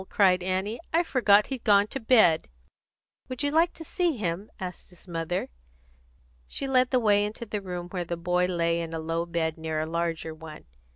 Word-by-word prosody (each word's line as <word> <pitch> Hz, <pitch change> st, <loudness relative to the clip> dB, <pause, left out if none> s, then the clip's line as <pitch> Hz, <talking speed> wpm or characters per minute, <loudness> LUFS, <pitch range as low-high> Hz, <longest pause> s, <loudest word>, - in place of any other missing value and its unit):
cried 185 Hz, -3 st, +4 dB
Annie. 190 Hz, +5 st, -2 dB
"I 335 Hz, +2 st, +3 dB
forgot 210 Hz, -9 st, +4 dB
he'd 255 Hz, -, -6 dB
gone 205 Hz, -2 st, +5 dB
to 270 Hz, -, -4 dB
bed." 220 Hz, -, +4 dB, 0.8 s
"Would 255 Hz, +2 st, -4 dB
you 285 Hz, -, +1 dB
like 330 Hz, +3 st, +3 dB
to 325 Hz, -, -10 dB
see 335 Hz, -2 st, -1 dB
him?" 195 Hz, 0 st, -3 dB
asked 180 Hz, -1 st, -7 dB
his 180 Hz, +1 st, -17 dB
mother. 170 Hz, +1 st, -3 dB, 1.0 s
She 275 Hz, -, -4 dB
led 255 Hz, -1 st, +3 dB
the 255 Hz, -, +3 dB
way 205 Hz, -3 st, +3 dB
into 210 Hz, +3 st, -5 dB
the 210 Hz, -1 st, -4 dB
room 180 Hz, -2 st, -5 dB
where 180 Hz, -1 st, -3 dB
the 170 Hz, 0 st, -4 dB
boy 180 Hz, +1 st, +1 dB
lay 170 Hz, -1 st, 0 dB
in 165 Hz, -1 st, -5 dB
a -, -, -3 dB
low 165 Hz, +1 st, -2 dB
bed 160 Hz, -1 st, -2 dB
near 160 Hz, -1 st, -2 dB
a 155 Hz, -, -1 dB
larger 165 Hz, -1 st, -2 dB
one. 155 Hz, -1 st, -11 dB
180 Hz, 195 wpm, -27 LUFS, 170-220 Hz, 1.0 s, gone